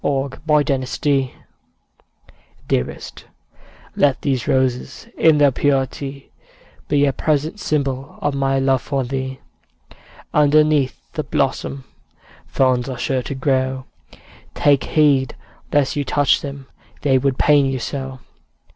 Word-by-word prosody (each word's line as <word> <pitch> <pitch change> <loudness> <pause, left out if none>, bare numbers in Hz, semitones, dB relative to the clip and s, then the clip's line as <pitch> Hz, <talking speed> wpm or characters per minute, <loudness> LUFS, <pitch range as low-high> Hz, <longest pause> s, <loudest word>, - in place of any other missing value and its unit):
Y 140 -1 0
Z - - -11
Valentine 145 -3 +2
Song 135 0 0 1.4
Dearest, 60 - -3 0.7
let 140 -2 +2
these 130 -4 -1
roses 130 0 -1
In 160 -2 +4
their 145 -1 +5
purity, 135 0 -2 0.6
Be 145 -1 +3
a 140 - +1
present 155 +7 -1
symbol 140 -5 -2
Of 145 -1 -1
my 135 0 +1
love 135 -1 +2
for 135 -2 -2
thee. 130 +1 -4 0.9
Underneath 150 -2 +2
the - - -2
blossom 70 -1 -2 0.6
Thorns 130 -1 +1
are 130 - -5
sure 130 +1 -1
to 140 - -5
grow; 130 -1 0 0.7
Take 145 -2 +3
heed 140 -4 +2 0.4
lest 145 -2 +2
you 145 - 0
touch 145 +1 +2
them, 140 -1 -7 0.4
They 135 -2 +3
would 135 0 0
pain 145 -2 +4
you 135 0 -1
so! 130 +1 -5
135 Hz, 125 wpm, -20 LUFS, 130-145 Hz, 1.4 s, their